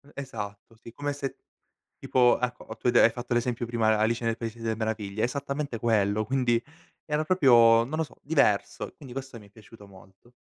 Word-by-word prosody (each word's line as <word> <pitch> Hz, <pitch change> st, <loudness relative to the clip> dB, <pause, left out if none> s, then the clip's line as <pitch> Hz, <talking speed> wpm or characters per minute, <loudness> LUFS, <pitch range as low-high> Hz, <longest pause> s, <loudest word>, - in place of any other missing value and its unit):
Esatto 110 Hz, -5 st, -7 dB
sì, 115 Hz, -, -11 dB
come 145 Hz, +2 st, -3 dB
se 140 Hz, -1 st, -5 dB, 0.6 s
tipo 125 Hz, -1 st, +3 dB
ecco 125 Hz, 0 st, -3 dB
o 110 Hz, -, -8 dB
tu 115 Hz, -, -4 dB
hai -, -, +5 dB
de 120 Hz, -, +6 dB
fatto 120 Hz, +1 st, -5 dB
l'esempio 120 Hz, 0 st, -1 dB
prima 115 Hz, -1 st, 0 dB
de' 110 Hz, -, +4 dB
Alice 115 Hz, +3 st, 0 dB
nel 115 Hz, 0 st, 0 dB
paese 115 Hz, 0 st, -6 dB
delle 115 Hz, -1 st, -1 dB
meraviglie, 110 Hz, -2 st, -3 dB
esattamente 140 Hz, 0 st, -3 dB
quello, 110 Hz, -2 st, +1 dB
quindi 125 Hz, -2 st, +1 dB, 0.4 s
era 150 Hz, 0 st, -1 dB
proprio 120 Hz, -9 st, +5 dB
non 150 Hz, +6 st, -4 dB
lo 160 Hz, -, +1 dB
so, 155 Hz, -, -12 dB
diverso. 140 Hz, -9 st, 0 dB
Quindi 135 Hz, -5 st, -11 dB
questo 135 Hz, -2 st, -7 dB
mi 105 Hz, -, -16 dB
è -, -, -23 dB
piaciuto 105 Hz, -1 st, -16 dB
molto. 95 Hz, +4 st, -19 dB
120 Hz, 195 wpm, -27 LUFS, 110-130 Hz, 0.6 s, de